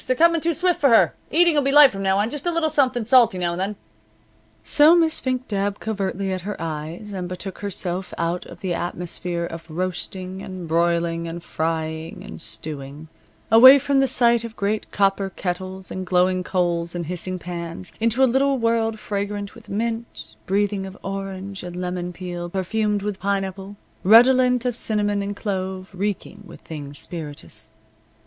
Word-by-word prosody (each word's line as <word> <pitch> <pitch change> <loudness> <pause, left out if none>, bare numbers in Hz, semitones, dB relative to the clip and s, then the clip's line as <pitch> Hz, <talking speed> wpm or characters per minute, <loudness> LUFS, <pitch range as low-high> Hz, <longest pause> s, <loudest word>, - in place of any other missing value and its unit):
They're 255 - +2
coming 335 +3 +4
too 335 0 0
swift 360 +2 +1
for 280 - +5
her. 230 - +5 0.2
The - - -3
eating 345 -1 +5
will 295 - +3
be 275 0 +1
light 290 -1 +8
from 195 - -6
now 190 0 +2
on; 210 +3 +1
just 295 +3 -5
a - - +2
little 330 -2 0
something 255 -4 +2
salty 235 -4 +5
now 175 -1 0
and 175 +2 -3
then." 200 +2 -1 0.9
So 295 - +6
Miss 330 -2 +3
Fink 255 -1 -2
dabbed 200 -1 -1
covertly 195 -2 -2
at 185 - -3
her 205 +3 -4
eyes 165 +6 -5
and 180 -2 -4
betook 185 +1 -6
herself 185 -2 -3
out 170 +1 -1
of - - -12
the 185 -2 -1
atmosphere 175 0 -3
of 165 0 -8
roasting, 185 +2 -3
and 185 -3 -7
broiling, 170 0 +1
and 170 +1 -6
frying, 160 0 -3
and 80 - -9
stewing; 140 +7 -5 0.4
away 260 +5 +10
from 280 0 +1
the 270 - +3
sight 235 -2 +3
of 230 -1 -7
great 205 +2 -2
copper 195 -1 +1
kettles, 185 0 -5
and 185 - -4
glowing 185 0 +2
coals 175 -2 -1
and 170 -1 -3
hissing 180 +2 -3
pans, 170 0 -6
into 230 +3 +3
a - - +8
little 270 +2 +2
world 230 -1 +1
fragrant 205 -1 -4
with 230 -3 -15
mint, 225 - -4
breathing 200 0 0
of 190 +1 -11
orange 195 0 -5
and 175 -1 -7
lemon 180 0 -3
peel, 175 -1 -6
perfumed 205 +2 -1
with 205 -2 -3
pineapple, 195 0 -3 0.3
redolent 250 +4 +6
of 245 -2 0
cinnamon 205 -3 0
and 200 +1 -4
clove, 190 -2 -4
reeking 200 +1 -4
with - - -13
things 145 -3 -8
spirituous. 145 -11 -6
195 Hz, 180 wpm, -22 LUFS, 175-225 Hz, 0.9 s, away